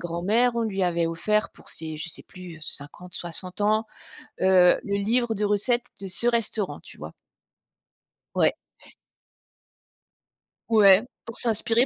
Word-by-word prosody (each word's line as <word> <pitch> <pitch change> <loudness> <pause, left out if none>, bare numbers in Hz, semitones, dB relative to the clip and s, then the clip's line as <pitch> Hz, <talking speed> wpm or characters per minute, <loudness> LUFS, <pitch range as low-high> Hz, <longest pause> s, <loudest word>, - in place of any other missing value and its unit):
grand-mère, 205 +9 0
on 235 - 0
lui 195 -4 -2
avait 170 -2 +1
offert, 210 +6 -1
pour - - -13
ses 160 -1 -4
je 155 +2 -6
sais - - -4
plus, 180 -3 -11
heu, - - -20
50-60 175 +5 -2
ans, 215 +2 +1 0.6
heu, 185 -1 +5
le 200 - -2
livre 235 +1 +1
de 210 - -2
recettes 210 +4 +2 0.2
de 195 - -5
ce 190 +6 +3
restaurant, 225 -4 0
tu - - -15
vois? - - -9 1.2
Ouais. - - +3 2.2
Ouais, 200 -3 +6 0.2
pour 230 - -8
s'inspirer 230 +1 +2
200 Hz, 135 wpm, -25 LUFS, 180-225 Hz, 2.2 s, Ouais